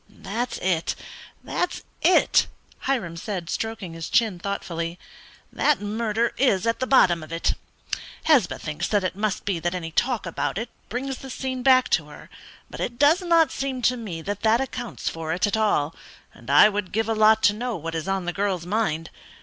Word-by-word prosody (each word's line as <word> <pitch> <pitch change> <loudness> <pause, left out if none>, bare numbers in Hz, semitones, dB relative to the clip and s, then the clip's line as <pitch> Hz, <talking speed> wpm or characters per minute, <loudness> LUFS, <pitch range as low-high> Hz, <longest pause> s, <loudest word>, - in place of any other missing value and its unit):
"That's 235 +5 -4
it; 175 -3 +1 0.5
that's 355 - -2 0.2
it," 365 - +4 0.3
Hiram 220 -12 -1
said, 175 -1 -4
stroking 220 -6 -4
his 165 0 -6
chin, 220 -6 +2
thoughtfully, 170 -3 -4 0.6
"that 300 - +2
murder 220 +2 -1
is 230 -8 +3
at 230 0 +1
the 255 - -1
bottom 175 -11 +5
of 155 - -10
it. 165 0 0 0.7
Hesba 270 - +3
thinks 155 +3 -4
it 190 -4 +1
must 210 0 -2
be 195 -4 0
that 175 +2 -1
any 165 -2 -4
talk 240 +5 0
about 170 - -2
it 230 +2 -4 0.2
brings 260 +2 -3
the 270 - -9
scene 260 0 -4
back 255 -1 +5
to 155 -3 +1
her; 150 - -13 0.4
but - - -10
it 240 - -3
does 295 +7 +5
not 335 -3 +4
seem 265 -2 -3
to 250 - +3
me 190 -9 -6
that 205 +2 -4
that 225 +1 +4
accounts 245 -3 -5
for 160 -1 -2
it 180 - +1
at 205 - 0
all, 205 -9 +1 0.4
and - - -14
I - - +8
would 205 -3 -3
give 225 +1 0
a 225 - +1
lot 220 0 +5
to 205 - +5
know 240 +2 -3
what 165 -1 -5
is 160 +1 -3
on 195 -2 -1
the 175 - -2
girl's 195 -3 -1
mind. 175 -5 -1
205 Hz, 190 wpm, -24 LUFS, 175-245 Hz, 0.7 s, I